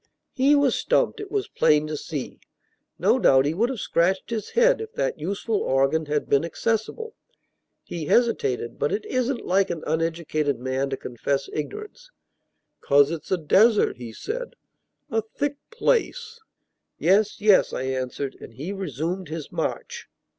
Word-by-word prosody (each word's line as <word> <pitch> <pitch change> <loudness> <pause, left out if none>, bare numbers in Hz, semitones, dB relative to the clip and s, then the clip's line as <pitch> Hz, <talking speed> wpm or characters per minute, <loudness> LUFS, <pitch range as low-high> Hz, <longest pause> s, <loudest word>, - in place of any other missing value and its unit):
He 275 +3 +4
was 285 -3 +3
stumped, - - +1
it 415 -2 -6
was 405 0 -1
plain 150 0 +3
to 155 0 -4
see. 145 -2 -6 0.6
No - - +3
doubt 135 0 +5
he 150 - +1
would 225 +8 +1
have 260 -4 -4
scratched 185 +5 0
his 220 -2 -3
head, - - +3
if 445 0 -6
that - - -2
useful 205 +3 -2
organ 135 +1 +1
had 150 0 -1
been 140 - +3
accessible. 225 - -2 0.7
He 165 -3 -5
hesitated; 135 - +1
but - - +1
it 210 - -2
isn't 255 0 -1
like 190 +2 +2
an 170 -3 -4
uneducated 160 -3 -1
man 130 +2 -1
to 135 - -3
confess 135 +3 -2
ignorance. 425 - -6 0.7
"'Cause 145 +1 +4
it's 165 -2 -6
a 185 - +2
desert," 205 +7 +4
he 120 -2 -8
said, 480 - -5 0.6
"a 225 0 +1
thick 285 +6 -3
place." 470 0 0 0.6
"Yes, 205 +3 +2
yes," 210 -2 +5
I - - -3
answered, 130 +1 -3
and 115 - -11
he 155 - -5
resumed 180 - -3
his 160 -2 -6
march. - - -4
180 Hz, 155 wpm, -24 LUFS, -, 0.7 s, doubt